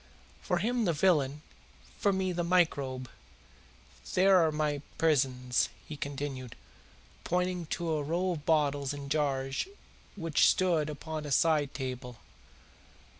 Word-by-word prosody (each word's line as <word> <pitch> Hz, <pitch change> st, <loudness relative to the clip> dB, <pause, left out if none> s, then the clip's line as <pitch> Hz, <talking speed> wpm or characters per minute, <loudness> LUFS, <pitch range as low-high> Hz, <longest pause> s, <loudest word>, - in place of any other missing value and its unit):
For 180 Hz, -, 0 dB
him 235 Hz, +5 st, 0 dB
the 170 Hz, -, +2 dB
villain, 150 Hz, -4 st, +2 dB, 0.6 s
for 200 Hz, -, +3 dB
me 190 Hz, -1 st, 0 dB
the 175 Hz, 0 st, -1 dB
microbe. 140 Hz, -8 st, +1 dB, 1.1 s
There 190 Hz, +1 st, +6 dB
are 160 Hz, -2 st, +3 dB
my 150 Hz, -2 st, -1 dB, 0.2 s
prisons," 130 Hz, -5 st, +2 dB, 0.2 s
he 155 Hz, -, -6 dB
continued, 140 Hz, -3 st, -5 dB, 0.7 s
pointing 180 Hz, -1 st, -1 dB
to 170 Hz, +2 st, -3 dB
a 155 Hz, -1 st, 0 dB
row 175 Hz, +5 st, 0 dB
of 155 Hz, -4 st, -4 dB
bottles 145 Hz, -3 st, +1 dB
and 140 Hz, -1 st, -7 dB
jars 135 Hz, -, 0 dB, 0.5 s
which 165 Hz, -6 st, +3 dB
stood 170 Hz, -5 st, +2 dB
upon 155 Hz, +1 st, -5 dB
a -, -, -6 dB
side 150 Hz, -1 st, +2 dB
table. 125 Hz, -3 st, -5 dB
150 Hz, 125 wpm, -30 LUFS, 140-175 Hz, 1.1 s, There